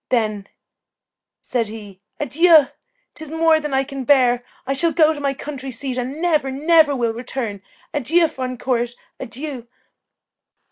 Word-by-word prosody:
Then," 215 -5 0 1.0
said 235 -3 -1
he, 205 -3 -10 0.2
"adieu! 315 0 +5 0.4
'tis 315 -2 -9
more 325 0 +3
than 300 -2 -5
I 270 0 +2
can 275 -1 -6
bear. 250 -3 +3 0.2
I 270 - -1
shall 330 +5 +1
go 315 -2 +4
to 295 - -8
my 280 -1 -1
country 270 -1 -7
seat, 260 +1 -4
and 255 +4 -4
never, 315 -5 +1
never 305 +2 +4
will 235 -3 0
return. 230 -4 -5 0.3
Adieu, 320 +4 +3
fond 255 -4 -5
court, 240 -2 -1 0.2
adieu! 255 0 -6
270 Hz, 145 wpm, -20 LUFS, 245-305 Hz, 1.0 s, adieu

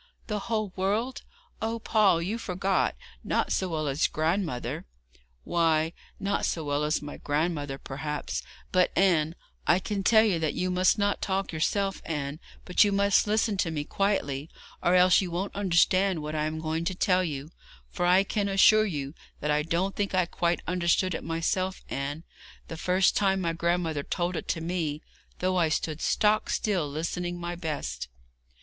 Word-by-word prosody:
'The 210 -1 -2
whole 215 -4 -1
world! 210 +7 -1 0.4
Oh, 225 +1 -1
Paul, 210 -6 +3
you 215 +7 -2
forgot. 190 - 0 0.3
Not - - 0
so 185 - 0
well 155 -2 -2
as 140 +3 +1
my - - -26
grandmother.' 160 - -1 0.6
'Why, 165 -1 +1 0.3
not 200 0 -1
so 165 - -1
well 145 0 0
as 150 0 0
my 145 - -7
grandmother, 145 -2 -1
perhaps; 150 +2 -4 0.3
but, 185 -1 +3
Anne, 170 -4 +3 0.3
I 175 - +5
can 195 +1 -3
tell 220 +2 +5
you 195 -7 +2
that 155 -2 -1
you 185 0 -1
must 185 +3 +3
not 205 -1 0
talk 195 -2 -1
yourself, 195 +5 0
Anne, 150 -1 -4 0.3
but 180 - +5
you 205 - +2
must 200 +1 +3
listen 215 -1 +1
to 185 - +1
me 155 -2 -2
quietly, 155 -6 -1 0.3
or 175 - +3
else 180 +1 +6
you 185 - -3
won't 180 +4 -3
understand 185 -2 +2
what 150 +1 -4
I 155 -1 0
am 155 +1 -3
going 160 +1 -2
to 185 +1 -1
tell 185 0 +2
you; 150 -2 -4 0.4
for - - -3
I 185 +2 +5
can 200 0 -1
assure 215 +2 +6
you 145 -6 -4 0.3
that 150 - -1
I 150 0 +2
don't 170 +5 -1
think 200 -2 -1
I 185 -1 +3
quite 170 -1 -1
understood 180 +1 +1
it - - -4
myself, 185 +3 -1
Anne, 145 +3 -3 0.5
the - - -5
first 185 +3 +2
time 195 -1 +2
my 170 -3 -1
grandmother 170 -2 0
told 175 +4 -2
it - - -4
to 165 - -1
me, 165 -3 -2 0.3
though 185 0 0
I 165 -3 +3
stood 155 0 -2
stock 215 0 +2
still 185 -9 0
listening 175 +4 -3
my 175 0 -4
best.' 145 - -4
175 Hz, 180 wpm, -28 LUFS, 155-195 Hz, 0.6 s, else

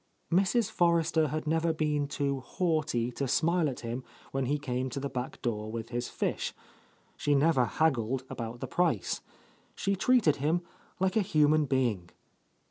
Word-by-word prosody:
Mrs. 195 +5 +2
Forrester 170 -2 +3
had 155 +3 -3
never 165 +1 +2
been 150 -2 0
too 140 -1 -1
haughty 150 -6 0
to 135 +3 -2
smile 160 +4 +2
at 130 - -6
him 120 +2 -4 0.3
when 135 -1 -1
he 145 +3 +1
came 130 -2 -2
to 135 - -4
the 140 0 -4
back 125 0 -4
door 110 -2 -2
with 115 0 -5
his 120 0 -3
fish. - - -2 0.6
She 145 - +1
never 140 -3 +4
haggled 130 -3 +1
about 115 0 -6
the - - -3
price. 165 - 0 0.5
She 200 0 0
treated 195 - +3
him 160 +5 +1 0.4
like 190 0 +1
a 220 - +4
human 155 -4 +3
being. 120 -10 0
145 Hz, 160 wpm, -30 LUFS, 125-165 Hz, 0.6 s, never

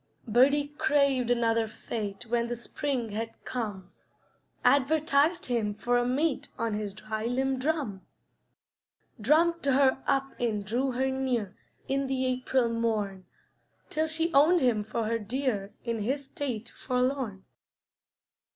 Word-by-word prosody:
Birdie 280 +6 +4
craved 280 -5 +3
another 230 -2 +2
fate 215 0 -5
When 235 0 0
the 240 - -2
spring 245 0 -3
had 225 +2 -4
come; 210 -7 -4 0.7
Advertised 290 +5 +3
him 220 -4 -1
for 240 +3 0
a 245 - 0
mate 280 +3 0
On 230 -1 -1
his 205 -1 -3
dry 215 +1 -4
limb 265 +2 0
drum. 270 -9 -1 1.2
Drummed 330 +9 +3
her 265 -1 +4
up 270 0 +1
and 215 -4 -1
drew 250 +5 0
her 265 +2 0
near, 250 -7 -1 0.3
In 275 0 0
the 260 -1 0
April 255 -1 +1
morn, 215 -5 -1 0.7
Till 315 +1 +1
she 325 +1 0
owned 310 +6 +6
him 235 -5 +2
for 220 +2 -2
her 230 +1 0
dear 220 -3 -2
In 230 -2 -2
his 270 +7 -1
state 265 -7 -4
forlorn. 250 -6 -2
250 Hz, 135 wpm, -29 LUFS, 220-275 Hz, 1.2 s, owned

